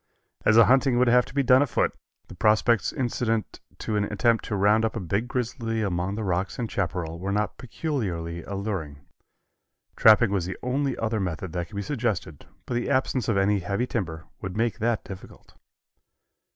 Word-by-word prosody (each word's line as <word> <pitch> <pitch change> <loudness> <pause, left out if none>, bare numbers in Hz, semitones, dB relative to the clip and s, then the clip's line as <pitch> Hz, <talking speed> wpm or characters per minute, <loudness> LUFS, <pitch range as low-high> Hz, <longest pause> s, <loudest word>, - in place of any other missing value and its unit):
As 110 - +5
the 115 - +8
hunting 130 -1 +3
would 125 0 +4
have 125 +1 +4
to - - -12
be 140 - +2
done 130 +1 +6
afoot, 145 -5 +1 0.3
the - - -11
prospects 110 +2 +2
incident 120 -4 -2 0.2
to 110 - -3
an 105 - +1
attempt 115 +1 +1
to 105 - -2
round 105 +3 +3
up 115 - -1
a - - -2
big 100 +5 -1
grizzly 115 -3 -2
among 90 0 -1
the 110 - -3
rocks 95 0 -1
and 115 -3 -3
chaparral 85 -3 -3
were 95 +2 -3
not 105 +1 -1
peculiarly 95 - -3
alluring. 95 -9 -5 0.9
Trapping 110 -1 +6
was 95 -4 -1
the 95 - -5
only 135 +1 -1
other 110 0 -1
method 90 -2 -4
that 85 -2 -3
could 100 - -13
be 100 - -2
suggested, 110 - -3 0.2
but - - -4
the 120 0 -1
absence 130 -2 0
of 110 - +2
any 100 +1 +2
heavy 100 +6 -1
timber 85 -9 -4 0.2
would 95 +1 -5
make 115 0 0
that 115 0 0
difficult. 95 -1 -12
110 Hz, 185 wpm, -26 LUFS, 95-120 Hz, 0.9 s, the